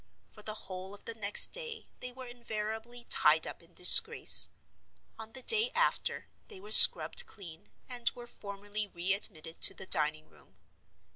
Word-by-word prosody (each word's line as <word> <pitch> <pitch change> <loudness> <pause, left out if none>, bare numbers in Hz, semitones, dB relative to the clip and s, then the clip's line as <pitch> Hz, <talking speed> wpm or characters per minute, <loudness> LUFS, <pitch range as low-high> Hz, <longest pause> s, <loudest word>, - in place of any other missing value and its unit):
For 210 - -21
the 215 0 -14
whole 190 -1 -15
of 205 - -26
the 230 - -10
next 205 -2 +1
day 470 -2 -11
they 250 - -13
were 260 +1 -17
invariably 235 0 -13
tied 155 +1 -1
up - - -14
in 170 +1 -27
disgrace. 445 - +5 0.7
On 225 0 -17
the 260 - -11
day 445 - -2
after - - -7 0.2
they 410 -4 -19
were 420 +3 -17
scrubbed 485 - +6
clean, 170 -6 -19 0.2
and 245 -2 -7
were 240 - -17
formally 205 -2 -13
re 180 +1 -8
admitted 165 -5 -8
to - - +1
the 190 - -13
dining 155 -2 -6
room. - - -31
215 Hz, 165 wpm, -24 LUFS, 190-250 Hz, 0.7 s, scrubbed